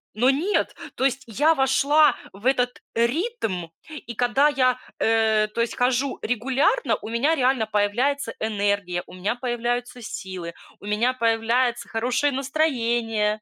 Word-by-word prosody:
но 245 +4 +3
нет, 325 +10 0 0.2
то 265 - 0
есть 270 0 0
я 295 +9 +3
вошла 280 +2 +4 0.2
в 200 +4 -14
этот 250 -2 +1
ритм 235 - -1 0.2
и 300 -6 -8
когда 245 +5 +3
я, 255 -4 +2 0.2
э, 220 -1 +3
то 215 +2 -3
есть 230 - -1
хожу 255 +2 0
регулярно, 265 - +1
у - - -7
меня 240 +8 +2
реально 260 -4 +2
появляется 225 +5 0
энергия, 200 -4 -1
у - - -13
меня 190 +5 -2
появляются 245 0 -3
силы, 185 -5 -6 0.3
у - - -13
меня 215 +5 +1
появляется 235 +1 +1
хорошее 245 +5 0
настроение. 235 -7 0
245 Hz, 140 wpm, -24 LUFS, 220-270 Hz, 0.3 s, вошла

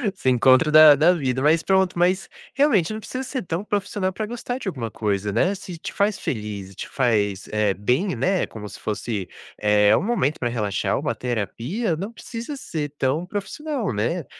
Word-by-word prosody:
Seu 130 - 0
encontro 130 +5 +4
da 155 -1 +9
da 160 +5 +5
vida, 130 -6 -1
mas 155 +3 +4
pronto, 190 0 +2
mas, 185 +2 +2 0.3
realmente, 225 - +3
não 215 - -4
precisa 255 +4 -5
ser 260 0 -4
tão 170 +2 -3
profissional, 205 -2 -1
pra 215 +3 -4
gostar 240 +2 -4
de 260 - -7
alguma 125 -11 -3
coisa, 105 -2 -2
né. 175 - +2
Se 185 -3 -8
te - - -7
faz 205 0 +1
feliz 105 -4 -5
e - - -16
te - - -6
faz, 105 -6 0
eh, 105 -2 +1
bem, 130 - 0
né. 180 +10 +1
Como 105 -2 -8
se - - -11
fosse, 105 -3 -3 0.3
eh, 105 0 +4
um - - +1
momento 195 - 0
pra 120 - -1
relaxar, 105 -6 -1
uma - - -1
terapia. 125 - -2
Não 195 +7 -5
precisa 235 +4 -7
ser 155 - -4
tão 140 +6 0
profissional, 215 - -3
né. 120 - -1
155 Hz, 190 wpm, -23 LUFS, -, 0.3 s, da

